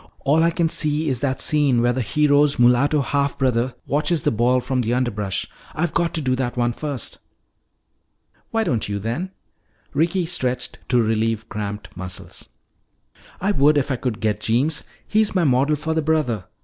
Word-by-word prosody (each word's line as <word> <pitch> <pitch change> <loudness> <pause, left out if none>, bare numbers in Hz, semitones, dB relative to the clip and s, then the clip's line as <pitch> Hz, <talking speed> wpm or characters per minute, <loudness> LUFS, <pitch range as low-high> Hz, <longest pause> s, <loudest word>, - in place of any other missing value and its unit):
All 145 +3 +3
I 165 - +4
can 170 0 +1
see 155 -1 +1
is 130 -3 -1
that 130 0 -1
scene 145 -5 +2
where 120 +1 +2
the 130 - -1
hero's 145 +3 +3
mulatto 125 +5 +4
half 140 0 -1
brother 125 -1 0
watches 150 +2 0
the - - +2
ball 120 +3 +2
from 130 0 -1
the 120 +1 0
underbrush. 105 -6 -2 0.3
I've 170 +2 -1
got 170 0 +1
to 160 - 0
do 130 -1 +1
that 125 -1 -2
one 120 0 +1
first." 145 -2 -4 1.3
"Why 225 -1 0
don't 120 - -1
you 100 - -2
then?" 115 - -3 0.6
Ricky 170 +5 +1
stretched 125 -7 -3
to 125 - +3
relieve 110 0 0
cramped 105 -1 -6
muscles. 90 0 -8 0.9
"I 195 +3 +1
would 150 -4 +4
if 140 0 0
I - - +1
could 120 -3 -3
get 105 -2 0
Jeems. 135 +9 +1 0.2
He's 215 -1 +1
my 180 - +3
model 140 +1 +3
for 160 +2 -2
the 160 - +1
brother. 150 - 0
130 Hz, 175 wpm, -22 LUFS, 120-155 Hz, 1.3 s, I